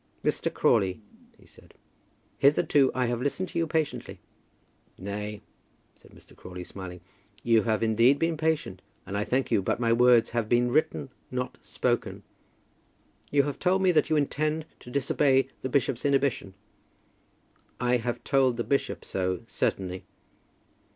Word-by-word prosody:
"Mr. - - 0
Crawley," 95 0 +2 0.4
he - - -21
said, - - -20 0.6
"hitherto 140 -1 +4
I 130 -1 +1
have 120 0 -2
listened 160 +7 -2
to - - -3
you 165 - 0
patiently." 125 - -2 0.8
"Nay," 105 +2 -5 0.5
said - - -21
Mr. - - -19
Crawley, 90 0 -9
smiling, 90 -1 -9 0.4
"you 115 -2 +4
have 110 -1 +1
indeed 115 +5 +4
been 165 +1 0
patient, 155 - -1 0.2
and 100 - -6
I 105 - 0
thank 130 +4 -1
you; - - +3
but 95 - -1
my 115 -1 +2
words 120 -1 +5
have 115 -2 -1
been 120 0 +3
written, 155 -1 0 0.2
not 125 0 -4
spoken." - - -2 1.1
"You 140 -1 +3
have 145 0 -4
told 190 +1 +2
me 185 - +5
that 155 -2 +2
you 155 - +2
intend 155 +2 0
to - - -12
disobey 135 0 +2
the 130 - -3
bishop's 130 -2 0
inhibition." 135 -8 0 1.2
"I 125 0 +2
have 120 0 -4
told 130 -3 +2
the 120 - -1
bishop 140 +2 -1
so 95 -2 -2
certainly." 95 -1 -2
125 Hz, 150 wpm, -27 LUFS, 110-145 Hz, 1.2 s, words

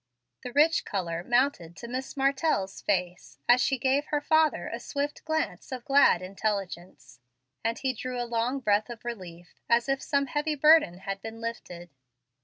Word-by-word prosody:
The 250 - -7
rich 310 +4 +4
color 170 -4 -3
mounted 240 -8 +1
to 235 - -8
Miss 260 +4 -5
Martell's 270 -7 0
face 180 -2 -2
as 245 +1 +6
she 270 - +1
gave 270 +3 +1
her 295 - 0
father 315 +1 +2
a - - -5
swift 285 0 -4
glance 315 -3 -2
of 255 -2 -6
glad 275 -10 +5
intelligence, 185 - -4 0.4
and 230 +1 -1
he 265 -1 -1
drew 250 +1 -5
a 240 - -1
long 240 +3 -1
breath 210 -1 +1
of 235 -1 -9
relief, 180 -7 -8 0.2
as 235 +1 +3
if 270 0 0
some 280 -1 0
heavy 295 +3 -1
burden 295 - +5
had 195 0 -5
been 225 +1 -8
lifted. 180 -7 -7
240 Hz, 170 wpm, -28 LUFS, 195-275 Hz, 0.4 s, as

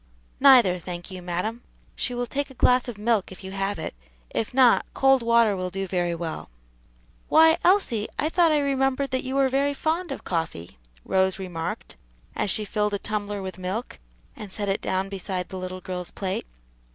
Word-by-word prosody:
"Neither, 245 -10 +6
thank 175 +2 -7
you, 185 -1 -7
madam: 180 +7 -3 0.3
she 250 - -2
will 245 0 -1
take 280 +3 -3
a 265 - -13
glass 250 +1 +3
of 240 -4 -6
milk 210 -2 +1
if 185 - -11
you 190 - -7
have 195 0 -2
it; 160 - -5 0.4
if 220 - -2
not, 250 -2 +5
cold 270 -1 +4
water 230 -3 +4
will 185 -1 -3
do 195 +1 -3
very 175 -2 -1
well," 165 -1 -5 0.8
"Why, 320 +1 +6
Elsie, 345 - +3
I 300 - +1
thought 335 0 +3
I 305 - +4
remembered 275 -1 0
that 260 - -1
you 260 0 -4
were 275 -1 +4
very 280 +2 +1
fond 325 +4 -1
of - - -6
coffee," 160 - -4 0.3
Rose 190 0 +2
remarked, 175 -4 -5 0.4
as - - 0
she 210 +2 0
filled 210 0 0
a - - 0
tumbler 205 -1 -4
with 190 0 -6
milk 185 - -4 0.4
and 210 -3 -9
set 205 0 -3
it 195 - 0
down 190 +1 -1
beside 190 -2 -4
the 190 - -6
little 185 0 -6
girl's 180 -1 -5
plate. 190 - -4
205 Hz, 190 wpm, -25 LUFS, 185-260 Hz, 0.8 s, Neither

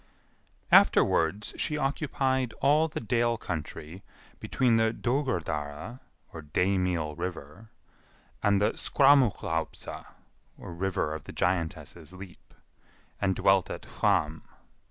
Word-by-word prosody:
Afterwards 95 +6 +4
she 150 - -1
occupied 135 -3 -1
all 150 +4 +4
the 155 - -5
Dale 115 +1 +1
country 80 0 -6 0.4
between 120 -3 +1
the 110 0 +3
Dogurdara 110 - -3 0.5
(day 95 +1 +2
meal 85 -5 -1
river) 90 +3 -7 0.7
and 100 -1 +3
the 105 - +2
Skraumuhlaupsa 120 - +1 0.5
(river 85 -3 -3
of 80 -2 -7
the - - -8
giantess's 90 0 -2
leap), 95 -1 -13 0.7
and 95 -1 +1
dwelt 95 -2 +3
at - - -6
Hvamm. 75 +1 0
95 Hz, 100 wpm, -28 LUFS, 85-125 Hz, 0.7 s, Afterwards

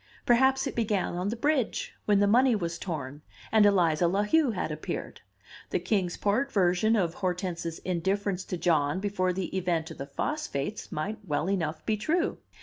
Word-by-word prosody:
Perhaps 265 +2 +4
it 275 - -4
began 210 -6 0
on 180 +3 -2
the 225 - -2
bridge, 275 0 0
when 205 -1 +4
the 205 - +4
money 245 +4 +4
was 170 -4 -3
torn, 145 -5 -5 0.3
and 215 -2 +6
Eliza 175 -4 +3
La 195 +4 +1
Heu 305 +6 +3
had 195 -7 -2
appeared. 155 0 -5 0.5
The - - +1
Kings 185 -5 -1
Port 235 +7 0
version 190 +3 +3
of 175 -6 +1
Hortense's 180 -2 -3
indifference 190 +2 -1
to 180 - -4
John 155 -2 +2
before 190 -2 0
the 185 +1 -4
event 170 -3 -1
of - - -10
the 140 - -5
phosphates 215 - -3
might 200 +8 -3
well 155 -2 -1
enough 160 -5 -2
be 215 -1 +1
true. 330 - 0
190 Hz, 175 wpm, -28 LUFS, 170-220 Hz, 0.5 s, and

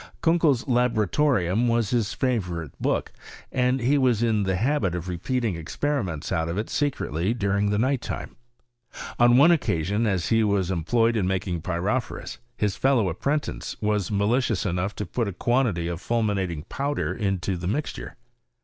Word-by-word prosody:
Kan 170 +1 +4
kei's 140 -8 +3
Laboratorium 120 -3 +2
was 115 -3 +1
his 115 -3 +1
favourite 90 - -1
book, - - -1 0.4
and 125 0 +1
ll« 135 +4 +2
was 125 -4 +2
in 110 -3 +2
the 95 -1 0
habit 110 - 0
of 90 0 -5
repeating 110 +5 -1
experiments 85 - -3
o»t 80 0 0
of 85 - -3
it 110 - -3
secretly 110 - -1
during 100 -2 +1
the 105 - +1
night 130 +3 +1
time. - - -6 0.8
On 120 0 +6
one 150 +6 +7
occasion, 105 - +1
as 95 -5 0
he 115 -1 +3
was 100 -3 +1
employed 115 +7 +1
in 100 -5 +1
making 95 -3 -2
pyrophorns, 90 - -3 0.2
his 105 -2 0
fellow 130 -8 +2
apprentice 140 - -2
was 105 -3 0
malicious 110 +1 +1
enough 95 +2 -1
to 105 - -4
put 120 -3 -2
a 100 - -4
quantity 120 -6 +1
of 85 +1 -4
fulminating 100 -9 -1
powder 140 - -2
into 95 -3 -1
the 85 0 -4
isixturt. 145 +10 -3
105 Hz, 160 wpm, -25 LUFS, 90-125 Hz, 0.8 s, one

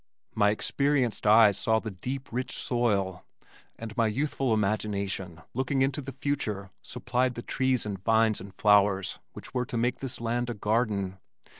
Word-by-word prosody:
My 105 -1 +3
experienced 130 +1 0
eyes 105 -2 +6
saw 110 0 +2
the 110 -1 -4
deep, 130 +8 -5
rich 125 +2 -3
soil, 100 -7 0 0.5
and 110 -1 -7
my 115 -1 +3
youthful 135 +2 -1
imagination 100 -5 -1
looking 130 +2 +1
into 135 +2 0
the 135 0 -7
future, 115 -8 -3
supplied 125 0 -1
the 120 - -6
trees 130 -3 0
and 100 -3 -5
vines 110 -1 +3
and 100 - -9
flowers 100 -2 +3
which - - -10
were 125 -1 -1
to 120 - -3
make 120 +2 0
this 130 -2 -4
land 120 +1 -1
a 120 - -3
garden. 105 -3 0
115 Hz, 160 wpm, -28 LUFS, 105-125 Hz, 0.5 s, eyes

